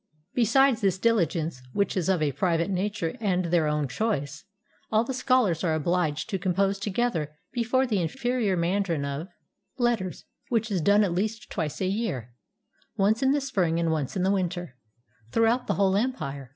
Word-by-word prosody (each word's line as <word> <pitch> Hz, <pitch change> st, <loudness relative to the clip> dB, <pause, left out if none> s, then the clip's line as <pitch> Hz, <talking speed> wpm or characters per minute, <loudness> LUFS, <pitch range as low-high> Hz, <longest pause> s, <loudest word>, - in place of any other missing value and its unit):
Besides 245 Hz, +1 st, +3 dB
this 195 Hz, -3 st, +2 dB
diligence 170 Hz, -, +1 dB
which 200 Hz, -, 0 dB
is 185 Hz, -1 st, 0 dB
of 180 Hz, -5 st, +2 dB
a 145 Hz, -, +1 dB
private 170 Hz, +4 st, 0 dB
nature 190 Hz, -3 st, -2 dB
and 185 Hz, -5 st, 0 dB
their 170 Hz, -2 st, +2 dB
own 150 Hz, -1 st, 0 dB
choice, 145 Hz, -, -2 dB, 0.5 s
all 220 Hz, +1 st, +4 dB
the 265 Hz, -, -4 dB
scholars 250 Hz, -10 st, +2 dB
are 160 Hz, -3 st, +2 dB
obliged 160 Hz, -1 st, 0 dB
to 195 Hz, -, -1 dB
compose 195 Hz, +2 st, +1 dB
together 195 Hz, -7 st, -1 dB, 0.2 s
before 250 Hz, +2 st, +1 dB
the 210 Hz, -7 st, 0 dB
inferior 240 Hz, +1 st, 0 dB
mandarin 170 Hz, -3 st, 0 dB
of 140 Hz, +5 st, -4 dB, 0.5 s
letters, 235 Hz, -7 st, -1 dB, 0.2 s
which 225 Hz, -2 st, 0 dB
is 185 Hz, -4 st, 0 dB
done 205 Hz, +5 st, +5 dB
at 185 Hz, -4 st, 0 dB
least 215 Hz, +5 st, -2 dB
twice 155 Hz, -5 st, -3 dB
a -, -, +1 dB
year, 185 Hz, -, -2 dB, 0.6 s
once 210 Hz, +4 st, +2 dB
in 265 Hz, -, +3 dB
the 290 Hz, -, +2 dB
spring 190 Hz, -12 st, 0 dB
and 165 Hz, -1 st, +1 dB
once 155 Hz, +1 st, -2 dB
in 180 Hz, -, 0 dB
the 190 Hz, -, +3 dB
winter, 175 Hz, -6 st, -2 dB, 0.6 s
throughout 230 Hz, +2 st, +2 dB
the -, -, +1 dB
whole 195 Hz, -1 st, +2 dB
empire. 145 Hz, -, -2 dB
190 Hz, 175 wpm, -26 LUFS, 165-225 Hz, 0.6 s, done